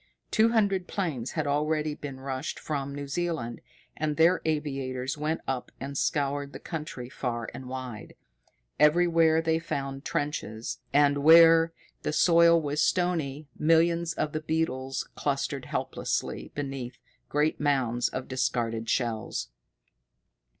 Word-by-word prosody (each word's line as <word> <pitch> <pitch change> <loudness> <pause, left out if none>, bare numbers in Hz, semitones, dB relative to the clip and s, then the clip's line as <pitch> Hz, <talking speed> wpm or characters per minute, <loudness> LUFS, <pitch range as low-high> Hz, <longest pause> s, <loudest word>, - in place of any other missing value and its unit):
Two 220 0 +4
hundred 200 -5 +1
planes 150 - -3
had 155 -2 -1
already 150 +1 0
been 140 -3 -7
rushed 135 +1 -4
from 140 -2 -3
New 145 0 -5
Zealand, 155 -6 -3 0.3
and 150 -1 -2
their 170 +3 +4
aviators 135 -4 -2
went 155 +2 -2
up 130 -2 -3
and 140 +1 -6
scoured 140 0 -1
the - - -7
country 150 -6 -6
far 120 -3 -4
and 130 -1 -8
wide. 130 -4 -7 0.6
Everywhere 165 0 +4
they 160 0 +2
found 135 -4 -4
trenches, 120 -6 -3
and, 145 0 +4
where 165 +2 +7 0.3
the - - -2
soil 170 +1 +6
was 150 -1 -1
stony, 155 -5 0
millions 165 +1 +3
of 155 -2 -2
the 155 - -3
beetles 135 -5 -2
clustered - - -2
helplessly - - -3
beneath 135 -3 -5 0.3
great 150 +2 +1
mounds 130 -5 +1
of 130 - -5
discarded 115 -3 -1
shells. 115 -4 -1
145 Hz, 130 wpm, -28 LUFS, 130-160 Hz, 0.6 s, where